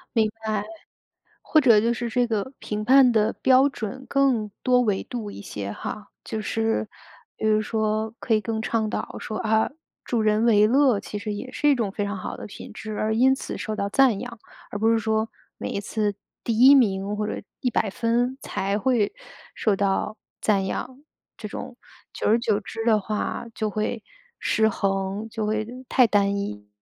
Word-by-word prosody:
明 220 -2 +3
白。 215 -2 -1 0.8
或 310 - +3
者 235 -6 +6
就 230 +3 +2
是 240 0 -3
这 245 +1 +1
个 220 +2 -2
评 210 0 -4
判 260 +3 +7
的 215 -1 +3
标 265 +2 +4
准 260 +1 -6
更 255 -7 +2
多 250 -1 +4
维 210 -5 +1
度 225 -5 -5
一 - - -9
些 100 - -5
哈， 210 - -6 0.2
就 220 - -3
是 225 +1 0 0.5
比 220 - -1
如 215 0 +3
说 215 0 -1
可 230 - 0
以 215 - +3
更 220 0 -2
倡 220 -1 0
导 - - -4
说， 215 - -5
啊， 220 0 +1 0.3
助 235 -2 0
人 215 0 +2
为 210 -2 +5
乐 260 -2 +4
其 210 - -6
实 210 +1 -4
也 205 +5 -6
是 295 - +2
一 - - +6
种 230 -5 -1
非 205 +1 -3
常 205 0 -3
好 185 - -5
的 - - -8
品 205 - -10
质 215 -1 -6
而 220 0 0
因 260 +3 +5
此 270 - -5
受 215 - -3
到 200 - -1
赞 235 -1 +3
扬。 240 0 -7 0.3
而 - - -3
不 220 +2 +3
是 230 - +3
说 220 0 0 0.3
每 - - -4
一 - - -2
次 205 0 -1 0.3
第 230 -2 -1
1 265 +3 +9
名 200 -5 +2
或 210 0 -2
者 - - -4 0.2
100 240 -4 +1
分 240 +5 0
才 200 0 -1
会 215 -2 +1 0.4
受 215 - +1
到 200 +2 0 0.2
赞 200 -3 +2
扬， 255 +7 -5 0.4
这 215 - -6
种 250 +4 -7 0.3
久 - - -3
而 220 - +5
久 215 -3 +1
之 220 +2 -6
的 220 -2 +4
话 210 +3 -3
就 215 - -1
会 215 +2 -2 0.3
失 220 0 +2
衡， 195 +1 -1
就 220 -1 -3
会 215 0 0 0.2
太 255 -1 +5
单 200 -2 +2
一。 105 - -5
220 Hz, 200 characters per minute, -24 LUFS, 210-235 Hz, 0.8 s, 1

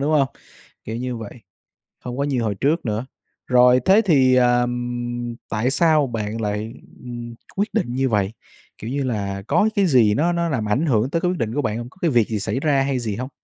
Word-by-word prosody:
đúng 145 +3 0
không? 135 -2 +2 0.6
Kiểu 110 - -5
như 125 0 -3
vậy, 110 -3 -7 0.7
không 125 0 -5
có 140 - +1
như 135 -4 0
hồi 110 -3 -1
trước 145 - 0
nữa. 110 +1 -2 0.4
Rồi, 125 0 +5
thế 200 +4 +5
thì, 135 -8 +4
à, 120 -1 +4
ừm, 120 -1 -3
tại 115 +4 0
sao 155 -1 +3
bạn 110 -2 -4
lại, 105 +1 -3 0.3
ừm, 120 -1 -7 0.2
quyết 205 +3 -1
định 180 - -1
như 135 +1 +1
vậy? 105 -3 0 0.5
Kiểu 110 - -6
như 140 +1 -1
là, 100 -5 -3
có 170 - +3
cái 200 -3 +3
gì 120 -9 +4
nó 165 +9 +2
nó 170 0 0
làm 115 -9 -2
ảnh 130 +10 +1
hưởng 120 -2 +1
tới 165 - 0
cái 180 - +1
quyết 180 - -3
định 115 0 -2
của 145 - 0
bạn 110 -2 -2
hông? 120 0 -6
Có - - -24
cái 170 - +2
việc 120 -5 +3
gì 110 - -2
xảy 110 +5 -2
ra 140 -2 +2
hay 135 -1 0
gì 110 -4 -3
hông? 125 +2 -4
125 Hz, 230 wpm, -22 LUFS, 115-140 Hz, 0.7 s, Rồi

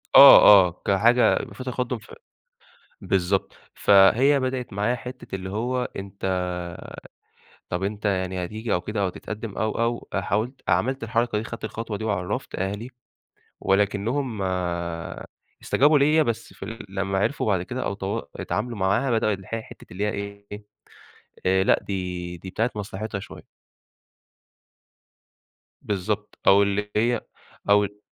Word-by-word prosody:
آه، - - +11 0.3
آه، 85 - -10
كحاجة 115 +5 +4 0.2
في 130 - -8
تقدُّم 125 -1 -2
في 110 - -14 0.9
بالضبط. 95 +1 0 0.2
فهي 115 +8 +5
بدأت 130 -2 -3
معايا 105 +5 0
حِتّة 125 -3 -9
اللي 95 0 -5
هو 125 +5 -1
أنت 100 0 -8 1.5
طَب 90 +1 -3
أنت 105 +2 -3
يعني 95 -2 -1
هتيجي 110 +5 -4
أو 90 - +2
كده 105 +3 -4
أو 95 - +2
تتقدم 110 +3 -7
أو، 110 0 +1
أو، 115 +1 -1
حاولت 110 +8 -2
عملت 115 +9 +1
الحركة 115 0 0
دي 110 - -4
خدت 115 -1 -7
الخطوة 110 0 -4
دي 110 - -6
وعرّفت 100 -4 -3
أهلي 100 +6 -3 0.7
ولكنهم 105 +4 0 1.2
استجابوا 145 +2 +4
ليَّ 150 +3 +4
بس 115 -5 -3
في - - -9
ال 115 -1 -8
لمّا 95 0 -2
عرفوا 140 +9 0
بعد 95 -5 +1
كده 125 +7 -5
أو 100 - -2
تو 100 0 -3 0.2
اتعاملوا 120 -3 -3
معاها 100 +8 +1
بدأوا 110 -2 +2
اللي 95 -2 -6
هي 115 - -2
ح - - -17
حِتّة - - -13
اللي 95 +4 -2
هي 105 - +1
إيه 100 0 -6 1.0
آآ، 95 +1 +3
لأ - - +4
دي 90 -2 -4
دي 95 +3 -9
بتاعة 115 +6 -1
مصلحتها 105 0 -5
شوية. - - -11 2.4
بالضبط، 105 +1 -3
أو 100 +1 +7
اللي 105 +1 -1
هي 115 +2 +2 0.5
أو 105 0 +3
105 Hz, 145 wpm, -24 LUFS, 95-120 Hz, 2.4 s, آه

